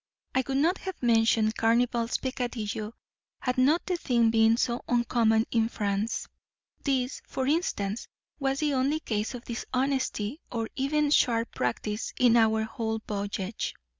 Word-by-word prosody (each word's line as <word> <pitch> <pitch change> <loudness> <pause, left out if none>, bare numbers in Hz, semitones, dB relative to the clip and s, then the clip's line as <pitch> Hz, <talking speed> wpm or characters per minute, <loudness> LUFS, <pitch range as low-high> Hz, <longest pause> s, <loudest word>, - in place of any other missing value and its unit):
I 260 - +2
would 270 0 0
not 335 +7 +2
have 380 -2 -6
mentioned 225 -2 +3
Carnival's 235 +1 +2
peccadillo 230 -4 -3 0.5
had 250 0 -1
not 295 +7 +3
the 365 -1 -1
thing 235 -7 +2
been 225 0 +4
so 240 0 0
uncommon 230 -2 +2
in 225 -1 +2
France. 205 0 -2 0.6
This, 265 -2 0
for 260 - -2
instance, 240 - -1 0.3
was 270 0 0
the 300 -2 +1
only 275 +4 +1
case 220 -3 -2
of 240 - -9
dishonesty 260 0 -2
or 225 -2 -2
even 290 +2 +1
sharp 230 -5 +2
practice 210 - -2
in 245 -2 +5
our 220 -1 +4
whole 220 0 -3
voyage. 200 0 -3
235 Hz, 140 wpm, -28 LUFS, 220-265 Hz, 0.6 s, in